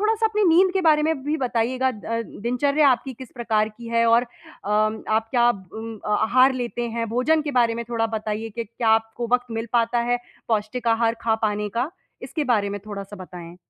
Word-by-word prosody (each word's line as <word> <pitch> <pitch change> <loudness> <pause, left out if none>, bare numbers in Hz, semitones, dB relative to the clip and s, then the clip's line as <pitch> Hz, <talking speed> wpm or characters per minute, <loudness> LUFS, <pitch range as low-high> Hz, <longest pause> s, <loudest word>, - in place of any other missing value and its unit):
थोड़ा-सा 445 +1 +2
अपनी 425 -1 0
नींद 370 +2 +5
के 385 - +1
बारे 305 -2 +4
में 310 -3 0
भी 300 +2 0
बताइएगा 255 -1 0
अ, - - -1 0.3
दिनचर्या 280 +8 +1
आपकी 260 +1 +1
किस 255 +1 -11
प्रकार 220 -3 0
की 230 +2 -11
है 230 0 +2
और 230 +1 +5
अम, 215 -2 -2
आप 220 +1 +1
क्या 240 -1 +4
ब 195 -4 -12
अम, 225 0 -6
अ, 210 0 +1
आहार 255 +4 +5
लेते 240 -1 -3
हैं? 230 0 -1
भोजन 255 +8 +2
के 295 - -3
बारे 230 -1 +2
में 235 0 -4
थोड़ा 230 -1 0
बताइए 220 0 -3
कि 235 - -2
क्या 230 +1 -3
आपको 225 +1 +1
वक़्त 250 0 +3
मिल 225 0 -4
पाता 235 0 +2
है 245 - +2 0.3
पौष्टिक 225 +2 -1
आहार 230 0 +2
खा 225 -1 +2
पाने 210 -1 0
का? 240 - -2 0.3
इसके 305 - -3
बारे 200 -2 0
में 205 0 -5
थोड़ा-सा 200 0 -7
बताएँ? 175 -1 -10
235 Hz, 210 wpm, -23 LUFS, 220-255 Hz, 0.3 s, नींद